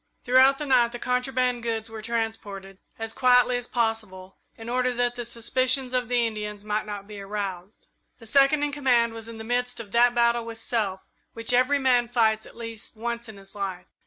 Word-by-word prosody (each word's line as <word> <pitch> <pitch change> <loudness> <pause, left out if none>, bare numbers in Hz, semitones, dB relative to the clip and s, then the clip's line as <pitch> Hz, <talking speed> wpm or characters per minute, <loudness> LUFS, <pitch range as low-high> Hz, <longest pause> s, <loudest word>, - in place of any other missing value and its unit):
Throughout 260 +2 +5
the 295 - -4
night 245 -3 +3
the - - -4
contraband 250 0 0
goods 225 -1 -2
were 225 -1 -8
transported, 210 -4 -4 0.2
as 225 0 -5
quietly 250 -1 +4
as 245 0 -6
possible, 215 -5 -2 0.2
in 225 - -10
order 250 +1 +1
that 245 0 +1
the 240 -1 -5
suspicions 255 +3 0
of 250 -2 0
the 245 -1 +2
Indians 210 -2 -5
might 215 0 -2
not 205 -1 -6
be 210 -1 -9
aroused. 195 -1 -6 0.3
The 230 - -14
Second 275 +5 +4
in 295 - 0
Command 245 -5 +2
was 225 0 -7
in 230 -1 -8
the 220 - -7
midst 245 +2 -1
of 215 -4 -9
that 240 +1 +4
battle 235 0 +3
with 230 -1 -7
self 210 -5 -1 0.3
which 230 +2 +1
every 255 +3 +4
man 250 -3 +2
fights 220 -2 +1
at - - -16
least 230 -1 -6
once 235 +1 -4
in 215 - -10
his 195 0 -11
life. 195 -3 -5
235 Hz, 200 wpm, -25 LUFS, 215-250 Hz, 0.3 s, Throughout